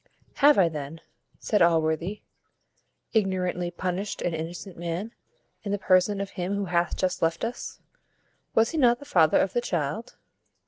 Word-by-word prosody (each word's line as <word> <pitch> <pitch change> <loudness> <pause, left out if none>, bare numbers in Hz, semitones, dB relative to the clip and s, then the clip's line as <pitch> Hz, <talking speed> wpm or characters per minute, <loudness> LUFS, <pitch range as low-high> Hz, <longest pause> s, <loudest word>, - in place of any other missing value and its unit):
"Have 290 +1 +6
I 185 -3 +5
then," 155 0 -6 0.4
said 210 -3 0
Allworthy, 165 +3 +1 0.9
"ignorantly 185 -4 0
punished 185 +3 -3
an 175 - -1
innocent 170 +4 -6
man, 175 +6 -4 0.5
in 200 - -4
the 205 - +1
person 190 +1 +3
of 200 0 -4
him 185 +1 -3
who 200 0 -1
hath 175 -2 0
just 185 -1 -1
left 165 0 0
us? 235 - -6 0.8
Was 225 0 +4
he 325 - -1
not 240 -3 +5
the 285 - -12
father 165 - +4
of 190 - +1
the 240 - +1
child?" 170 - -3
185 Hz, 155 wpm, -26 LUFS, 170-205 Hz, 0.9 s, Have